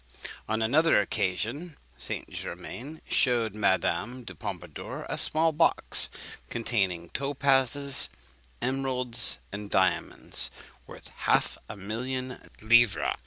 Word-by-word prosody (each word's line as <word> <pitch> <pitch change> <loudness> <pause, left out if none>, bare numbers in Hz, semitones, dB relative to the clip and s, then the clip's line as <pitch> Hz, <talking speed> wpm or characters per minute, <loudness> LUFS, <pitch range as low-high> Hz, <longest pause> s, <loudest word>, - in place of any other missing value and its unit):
On 110 0 +1
another 155 +5 +4
occasion 110 - -2 0.2
St. - - -3
Germain 150 +6 -7
shewed 120 -5 +1
Madame 105 +4 0
du - - -9
Pompadour 90 -7 -7
a - - -2
small 160 +1 +3
box, 160 +2 +2 0.4
containing 95 -8 -1
topazes, 140 0 +2 0.5
emeralds, 125 -3 0 0.2
and 100 0 -5
diamonds 95 -4 +2 0.4
worth - - -11
half - - +1
a 105 - -6
million 125 +6 -4
of 125 - -14
livres. 120 -1 +4
120 Hz, 105 wpm, -28 LUFS, 100-135 Hz, 0.5 s, another